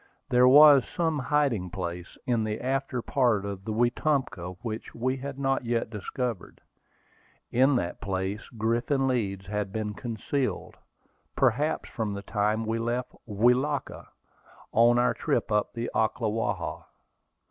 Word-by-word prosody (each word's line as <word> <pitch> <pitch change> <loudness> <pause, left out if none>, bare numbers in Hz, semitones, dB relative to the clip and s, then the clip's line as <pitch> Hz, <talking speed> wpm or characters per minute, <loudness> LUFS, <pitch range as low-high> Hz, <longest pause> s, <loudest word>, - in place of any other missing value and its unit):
There 125 +1 +5
was 145 0 +8
some 160 -3 +1
hiding 130 -8 +1
place 90 -1 -6
in 120 -3 +1
the 110 0 -2
after 130 -1 -2
part 120 -7 +1
of 100 -1 -6
the 110 - -3
Wetumpka 120 - 0
which 110 -2 -5
we 130 +3 -1
had 135 0 -6
not 135 -1 0
yet 115 -2 -1
discovered. 115 0 -4 0.9
In 130 +3 +4
that 85 -7 -2
place 95 +2 -3
Griffin 120 +4 0
Leeds 100 -7 -1
had 105 0 -3
been 105 0 -3
concealed, 120 +4 -3 0.6
perhaps 135 +3 +1
from 110 -4 -3
the 100 - -6
time 105 +2 0
we 115 +1 -1
left 120 +2 -2
Welaka, 125 +7 +1 0.6
on 120 +1 +5
our 125 +1 +3
trip 115 - -1
up 105 0 +1
the 120 +1 -3
Ocklawaha. 110 0 -1
115 Hz, 135 wpm, -27 LUFS, 105-130 Hz, 0.9 s, was